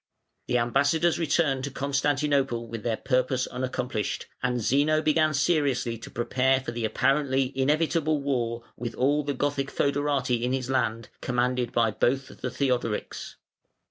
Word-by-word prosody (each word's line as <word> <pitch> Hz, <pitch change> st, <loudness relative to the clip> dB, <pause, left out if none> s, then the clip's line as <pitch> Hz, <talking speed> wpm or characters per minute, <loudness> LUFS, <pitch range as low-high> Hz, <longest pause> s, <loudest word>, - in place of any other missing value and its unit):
The 125 Hz, -, +2 dB
ambassadors 145 Hz, +8 st, +2 dB
returned 145 Hz, -4 st, +1 dB
to -, -, -3 dB
Constantinople 140 Hz, -2 st, 0 dB
with 115 Hz, -1 st, -6 dB
their 115 Hz, 0 st, -1 dB
purpose 130 Hz, -1 st, +1 dB
unaccomplished, 125 Hz, -4 st, -3 dB, 0.2 s
and 125 Hz, 0 st, 0 dB
Zeno 145 Hz, +7 st, +2 dB
began 155 Hz, 0 st, +3 dB
seriously 140 Hz, -6 st, +1 dB
to 115 Hz, -, -9 dB
prepare 130 Hz, +2 st, +1 dB
for 130 Hz, -, -5 dB
the 120 Hz, -1 st, -2 dB
apparently 135 Hz, +2 st, +1 dB
inevitable 155 Hz, +2 st, +1 dB
war 120 Hz, -4 st, -1 dB
with 120 Hz, -1 st, -5 dB
all 145 Hz, +4 st, +2 dB
the 145 Hz, -1 st, -2 dB
Gothic 140 Hz, 0 st, -1 dB
fœderati 140 Hz, -4 st, 0 dB
in 125 Hz, +2 st, 0 dB
his 130 Hz, -1 st, -2 dB
land, 115 Hz, -3 st, 0 dB
commanded 125 Hz, 0 st, 0 dB
by 115 Hz, -2 st, +2 dB
both 135 Hz, +5 st, 0 dB
the -, -, -2 dB
Theodorics. 125 Hz, -5 st, -2 dB
130 Hz, 140 wpm, -27 LUFS, 120-145 Hz, 0.2 s, began